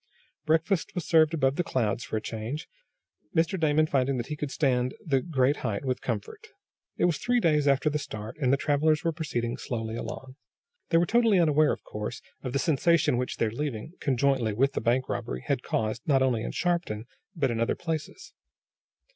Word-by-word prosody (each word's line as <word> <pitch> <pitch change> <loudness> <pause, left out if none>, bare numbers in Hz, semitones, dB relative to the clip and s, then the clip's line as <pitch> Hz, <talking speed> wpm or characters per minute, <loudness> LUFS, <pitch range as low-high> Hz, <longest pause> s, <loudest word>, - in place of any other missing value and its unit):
Breakfast 165 +4 +1
was 175 -3 -3
served 160 -2 +5
above 140 -4 +1
the 175 - +2
clouds, 120 -6 -1
for 110 - -3
a - - -3
change, 115 +8 -5 0.7
Mr. 165 +3 +2
Damon 155 -1 +3
finding 135 -3 +1
that 120 - -2
he - - -2
could 150 -1 -4
stand 130 -3 +1
the 135 -5 +2
great 140 -3 +1
height 110 +1 -3
with 130 -1 -1
comfort. 445 -1 -4 0.5
It - - +3
was 170 -4 +1
three 245 0 +2
days 150 -7 +2
after 140 +2 +3
the 150 0 +1
start, 110 -6 -7
and 130 -4 +2
the 140 - +4
travelers 150 +2 +2
were 165 - +1
proceeding 120 -7 -3
slowly 115 -2 -4
along. 130 +3 -7 0.5
They 165 - +4
were 170 - +4
totally 230 0 +4
unaware, 155 -2 +4
of - - -4
course, 105 0 -5 0.2
of 130 - -4
the 140 - 0
sensation 160 -1 +3
which 125 0 -2
their 110 - +1
leaving, 135 +2 -4
conjointly 130 -4 +1
with 135 +6 +2
the - - -2
bank 125 +2 +1
robbery, 65 +1 -4
had - - 0
caused, 110 +2 -2
not 135 -3 +4
only 125 -4 +1
in - - -3
Shopton 170 -12 -1 0.3
but 140 -6 +1
in 115 - -2
other 115 - +1
places. 165 - -5
140 Hz, 195 wpm, -28 LUFS, 120-160 Hz, 0.7 s, served